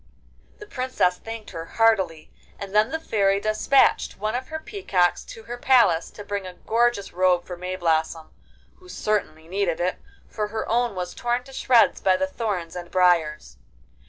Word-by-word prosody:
The 420 - -10
Princess 255 - 0
thanked 225 -1 -8
her 165 0 -6
heartily, 190 -9 +2 0.3
and 200 -1 -8
then 210 +1 +4
the 320 - -3
Fairy 200 -8 +1
despatched 215 +6 +2
one 215 +2 -2
of 255 +1 -3
her 315 - -5
peacocks 315 - 0
to 225 - -11
her 240 +2 -7
palace 230 -11 +4
to 205 - -11
bring 200 -2 -4
a 180 - -10
gorgeous 230 -1 0
robe 180 -1 +2
for 180 - -6
Mayblossom, 165 -3 -2 0.5
who 365 0 -18
certainly 165 - -2
needed 185 -2 -1
it, 180 +1 -1 0.3
for 210 -1 -3
her 220 +1 -4
own 235 -2 0
was 180 -1 -4
torn 240 +1 -1
to 270 - -14
shreds 245 -3 +3
by 185 -1 +3
the 285 - 0
thorns 205 -11 -4
and 175 -1 -7
briars. 165 - +1
200 Hz, 170 wpm, -24 LUFS, 180-240 Hz, 0.5 s, then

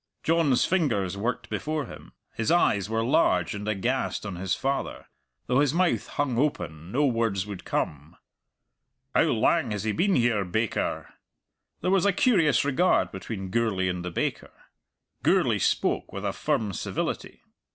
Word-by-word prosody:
John's 160 -6 +3
fingers 115 - 0
worked 115 +5 -2
before 155 -1 -2
him; - - -12 0.2
his 115 - -2
eyes 105 - +3
were 115 0 0
large 115 - +2
and 105 +1 -6
aghast 110 +4 -1
on 100 -3 -4
his 90 +1 -1
father; 135 +1 -3 0.4
though 125 +2 +2
his 145 +1 +2
mouth 180 -1 +1
hung 135 -5 -1
open 85 - -2
no 145 +5 +2
words 115 -7 0
would 100 -3 -8
come. 75 +3 -3 1.0
"How - - +4
lang - - +2
has 105 -1 -3
he 110 - 0
been 185 - +2
here, 120 -4 +2
baker?" 105 +5 -2 0.7
There 185 - 0
was 195 0 +3
a 200 - +3
curious 175 - +3
regard 160 +6 +2
between 95 -1 -6
Gourlay 105 -5 +1
and 90 -1 -3
the 90 - -3
baker. 85 - -2 0.7
Gourlay - - +3
spoke - - 0
with - - -5
a - - -1
firm 105 -3 -1
civility. - - -4
115 Hz, 155 wpm, -26 LUFS, 95-145 Hz, 1.0 s, How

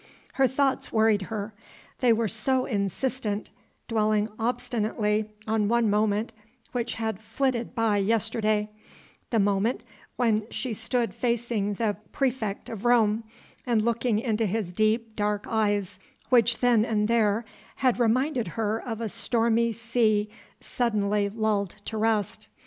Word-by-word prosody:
Her 270 -1 +3
thoughts 270 +1 0
worried 220 -2 +3
her. 215 -1 -4 0.5
They 250 -2 +4
were 225 0 +2
so 255 +5 +1
insistent, 210 +1 -2 0.4
dwelling 215 -2 +1
obstinately 220 -3 -1 0.2
on 220 -1 +1
one 230 -1 +2
moment 210 +2 +1 0.4
which 240 -1 -2
had 220 -2 -3
flitted 240 +2 -2
by 225 -3 +2
yesterday 215 0 +1 0.6
the 230 - +1
moment 205 +3 +1 0.3
when 220 -3 +1
she 255 -4 -3
stood 230 +2 -1
facing 235 -4 -1
the 210 -1 -1 0.2
praefect 240 -7 -1
of 220 -3 -7
Rome, 225 -2 +3 0.4
and 235 -4 +1
looking 235 -1 +1
into 225 -1 0
his 195 -3 -2
deep, 220 +2 +1
dark 210 0 -1
eyes, 205 -4 0 0.3
which 235 -2 +4
then 240 -3 +4
and 210 -2 +1
there 225 -1 +2 0.3
had 255 -2 +1
reminded 245 - +1
her 220 0 0
of 225 -2 -5
a 225 - -1
stormy 230 +1 +1
sea 225 -2 +1 0.3
suddenly 210 -4 0
lulled 210 -3 -1
to 220 - -5
rest. 215 -2 0
225 Hz, 130 wpm, -26 LUFS, 210-235 Hz, 0.6 s, They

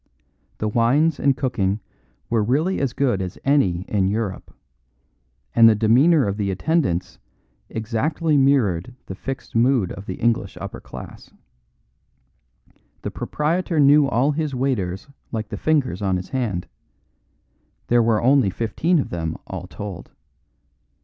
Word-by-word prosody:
The 110 - -2
wines 130 +8 +2
and 140 -2 +2
cooking 105 -6 0 0.5
were 115 -2 +1
really 150 - +1
as 135 -3 0
good 125 -7 0
as 90 -1 -5
any 115 -12 +2
in 95 -2 0
Europe, 100 -2 -3 1.0
and 115 -1 +7
the 110 - +4
demeanour 130 +8 +4
of 100 +1 -2
the 100 -2 -1
attendants 95 - -1 0.5
exactly 145 +9 -1
mirrored 125 -7 +2
the - - -6
fixed 135 +7 -7
mood 120 -4 +3
of 95 - -9
the 95 - -4
English 120 +1 -1
upper - - -7
class. - - -11 1.7
The - - -3
proprietor 165 +2 -1
knew 145 0 +6
all 135 +3 +2
his 150 -2 -2
waiters 110 -8 -2 0.2
like 110 -2 -4
the - - -4
fingers 140 - 0
on 95 -2 +1
his 90 - -7
hand; 115 -10 -2 1.2
there 120 0 +3
were 115 -1 +2
only 130 -4 +4
fifteen 115 - 0
of 145 - -2
them 80 -2 -3
all 90 -1 -7
told. 90 +1 -8
115 Hz, 135 wpm, -22 LUFS, 95-140 Hz, 1.7 s, and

